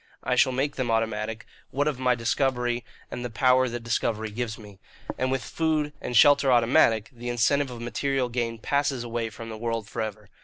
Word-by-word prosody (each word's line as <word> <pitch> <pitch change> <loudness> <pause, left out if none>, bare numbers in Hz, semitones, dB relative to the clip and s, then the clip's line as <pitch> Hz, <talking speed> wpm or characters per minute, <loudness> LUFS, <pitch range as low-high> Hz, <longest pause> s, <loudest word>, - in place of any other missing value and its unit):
I 130 - 0
shall 130 - +4
make 135 +3 -1
them 130 -3 -1
automatic, 110 0 -1 0.2
what 145 +3 0
of 145 -4 -1
my 125 -1 +2
discovery 120 0 0 0.3
and 120 - -5
the 125 - -3
power 130 +2 +3
that 120 0 -5
discovery 110 -1 -1
gives 110 0 -4
me. 105 -3 -13 0.4
And 130 - -1
with 130 -1 -1
food 155 -2 -1
and 120 - -1
shelter 140 -2 +6
automatic, 115 -2 +3
the 120 0 -6
incentive 135 +4 +2
of 120 -2 -8
material 130 +2 -1
gain 120 -1 -2
passes 140 +1 0
away 115 -1 -3
from 115 +1 -9
the 110 -1 -7
world 115 -2 -2
for 115 - -4
ever. 105 -1 -6
120 Hz, 195 wpm, -26 LUFS, 115-130 Hz, 0.4 s, shelter